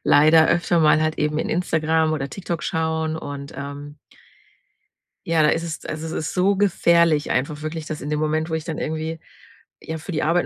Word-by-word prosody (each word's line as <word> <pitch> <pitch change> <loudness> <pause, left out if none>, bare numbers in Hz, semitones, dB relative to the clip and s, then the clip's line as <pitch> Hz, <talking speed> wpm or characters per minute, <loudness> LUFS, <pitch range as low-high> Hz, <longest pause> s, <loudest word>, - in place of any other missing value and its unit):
leider 155 +2 +6
öfter 170 0 +2
mal 155 0 +5
halt 155 0 0
eben 150 0 0
in - - -2
Instagram 160 -2 +1
oder 140 -3 -2
TikTok 175 -4 -5
schauen. 160 -1 -1
Und, 140 -2 -7
ähm 145 +1 -7 1.3
ja, 165 -2 +3
da 150 - +5
ist 165 - 0
es 165 -2 -6
also, 155 +1 -5
es 160 - -5
ist - - -5
so 195 +2 +2
gefährlich 170 -5 +3
einfach 150 +4 -1
wirklich, 155 0 -5
dass 155 - -5
in 145 - -6
dem 150 - 0
Moment, 155 +1 0
wo - - -4
ich 160 -1 -1
dann 165 -3 -5
irgendwie, 160 +1 -3 0.6
ja, 160 - -5
für 160 +3 -7
die 155 - -1
Arbeit 170 +3 +2
160 Hz, 200 wpm, -22 LUFS, 150-165 Hz, 1.3 s, leider